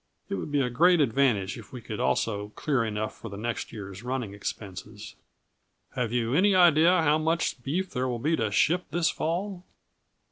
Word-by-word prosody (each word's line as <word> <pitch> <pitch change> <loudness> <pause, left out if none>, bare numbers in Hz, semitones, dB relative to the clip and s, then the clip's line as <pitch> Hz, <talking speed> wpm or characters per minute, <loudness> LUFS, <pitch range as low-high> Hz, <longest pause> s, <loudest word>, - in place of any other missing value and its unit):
It - - -3
would 100 +9 -4
be 145 -1 +2
a 125 - 0
great 175 +7 +5
advantage 115 -7 +1
if 110 - -13
we 125 - -7
could 110 -2 -7
also 105 -2 0
clear 135 -6 0
enough 110 -1 -3
for 115 - -9
the 100 - -8
next 115 +2 -4
year's 100 -2 -8
running 125 -4 -3
expenses. 105 0 -7 0.8
Have 120 -3 -2
you 120 0 0
any 190 +6 +4
idea 170 0 +5
how 155 0 +3
much 160 -4 0
beef 175 +9 -2
there 130 0 -1
will 125 -2 -2
be 150 +8 +1
to 110 -7 -1
ship 170 - +2
this 165 +2 +1
fall?" 180 +3 -3
125 Hz, 185 wpm, -27 LUFS, 110-160 Hz, 0.8 s, great